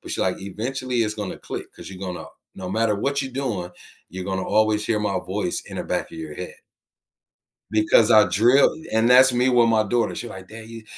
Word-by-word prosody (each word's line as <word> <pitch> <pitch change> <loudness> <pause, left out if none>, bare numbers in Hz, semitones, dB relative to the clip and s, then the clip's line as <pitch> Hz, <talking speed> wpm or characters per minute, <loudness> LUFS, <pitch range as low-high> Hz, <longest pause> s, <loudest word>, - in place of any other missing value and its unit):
but - - -10
she's - - -3
like, - - -1
"eventually 120 +5 -3
it's 105 -1 -1
gonna 105 -3 -6
click - - -7
'cause - - -11
you're 95 - -10
gonna 90 -2 -6 0.3
no 90 -1 -7
matter 110 +1 +1
what 140 +7 -1
you 135 -1 -4
doing, 115 -10 -3 0.4
you're 95 0 -7
gonna 95 0 -3
always 105 0 +2
hear 110 - +1
my 100 -2 -1
voice 95 -1 -3
in - - -9
the - - -4
back - - -3
of - - -11
your 80 -2 -7
head. 90 +2 -7 1.2
Because 110 +1 +3
I 110 -1 +7
drilled 120 - +4
and 110 +2 +2
that's 130 +1 +7
me 125 +1 +2
with 120 -2 +4
my 110 -1 +3
daughter, 115 +3 0
she's 120 - -6
like, 95 -2 -10
"Dad, 110 0 -11
you 115 -1 -10
110 Hz, 220 wpm, -23 LUFS, 95-120 Hz, 1.2 s, I